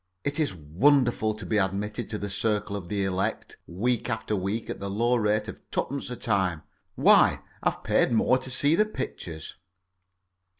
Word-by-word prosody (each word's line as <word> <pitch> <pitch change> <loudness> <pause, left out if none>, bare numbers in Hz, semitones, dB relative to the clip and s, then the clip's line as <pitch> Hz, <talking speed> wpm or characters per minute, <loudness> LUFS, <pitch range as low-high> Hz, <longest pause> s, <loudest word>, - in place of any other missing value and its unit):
It 140 +2 -1
is 150 -11 0
wonderful 110 - +2
to 105 - -8
be 110 - +1
admitted 100 +4 -2
to 110 - -3
the 100 - -4
circle 105 0 -1
of 95 -4 -6
the 100 -1 -1
elect, 95 0 -2
week 115 +8 -1
after 110 -2 -2
week, 100 +4 -2
at - - -5
the 100 - -4
low 120 +5 +2
rate 105 -1 +1
of 110 - -8
twopence 140 0 -2
a 125 - -4
time. 95 -9 0 0.3
Why, - - +5 0.2
I've - - -1
paid - - +2
more 125 +3 +3
to 130 - -7
see 145 +4 +2
the 210 +6 +4
pictures. 90 - -6
110 Hz, 175 wpm, -27 LUFS, 100-125 Hz, 0.3 s, Why